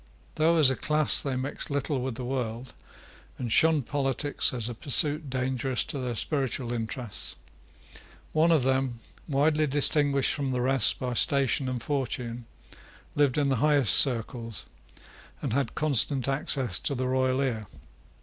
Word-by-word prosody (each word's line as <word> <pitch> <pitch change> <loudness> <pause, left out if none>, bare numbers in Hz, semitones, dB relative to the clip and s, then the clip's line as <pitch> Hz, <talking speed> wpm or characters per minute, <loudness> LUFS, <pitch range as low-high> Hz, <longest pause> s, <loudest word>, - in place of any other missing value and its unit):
Though, 165 +2 +2
as 145 -5 +7
a - - -1
class, 150 +2 +2
they 135 -2 -3
mixed 130 +2 -4
little 140 -1 -2
with 130 -2 -4
the 125 +1 -6
world, 125 -1 -4 0.6
and 120 -3 -5
shunned 160 -2 +4
politics 140 +1 0
as 120 -3 -3
a 120 - -5
pursuit 145 +4 0
dangerous 130 0 -1
to 140 - -6
their 125 -2 -4
spiritual 130 -2 -2
interests, 115 -1 -5 1.0
one 160 +2 +3
of 155 -6 +3
them, 130 -2 -1 0.3
widely 150 +2 +1
distinguished 145 -1 +2
from 140 -3 -3
the 125 - -1
rest 130 -2 +2
by 125 -1 -4
station 135 +1 +2
and 125 -2 -4
fortune, 125 -4 -4 0.7
lived 145 -2 +1
in 145 -2 +1
the 135 - +1
highest 145 -8 +4
circles, 115 -4 +1 0.7
and - - -4
had 140 -2 -1
constant 140 -2 +2
access 135 -7 -1
to 140 - -2
the 130 0 -2
royal 130 0 0
ear. 115 -6 -2
130 Hz, 150 wpm, -27 LUFS, 125-145 Hz, 1.0 s, as